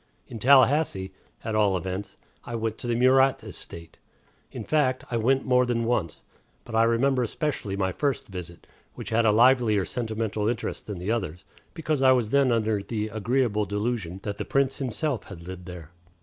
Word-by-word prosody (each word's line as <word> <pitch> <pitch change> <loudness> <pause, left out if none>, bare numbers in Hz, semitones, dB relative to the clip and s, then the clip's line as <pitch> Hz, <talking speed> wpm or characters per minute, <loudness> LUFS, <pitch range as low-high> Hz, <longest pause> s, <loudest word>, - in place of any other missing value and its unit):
In 115 - -8
Tallahassee, 130 -5 +4 0.3
at 110 - -3
all 105 -3 +3
events, 95 +2 -5 0.3
I 120 - -6
went 110 -1 -3
to - - -5
the 120 - 0
Murat 130 +2 +4
estate. 85 -1 -10 0.5
In - - -6
fact, 135 -4 +1
I 120 - 0
went 130 +4 +1
more 125 -1 +4
than 120 -2 0
once; 110 -9 -1 0.4
but 120 - -10
I 110 - +4
remember 125 +3 +2
especially 120 -5 -3
my 95 -1 0
first 140 +3 -1
visit, 90 -3 -8 0.3
which - - -7
had 115 0 +3
a - - +5
livelier 115 -3 +4
sentimental 110 -3 -2
interest 120 0 -4
than 105 -3 -5
the 90 +5 -3
others 95 -7 -3 0.3
because 155 -4 -1
I 130 -1 +6
was 120 -4 0
then 140 0 +3
under 110 -3 +1
the 105 +1 -3
agreeable 110 0 0
delusion 105 -3 -3
that 105 -1 -5
the - - -1
Prince 135 -1 0
himself 135 0 -2
had 85 -4 -11
lived 90 -1 -8
there. 85 -3 -9
115 Hz, 180 wpm, -26 LUFS, 100-130 Hz, 0.5 s, I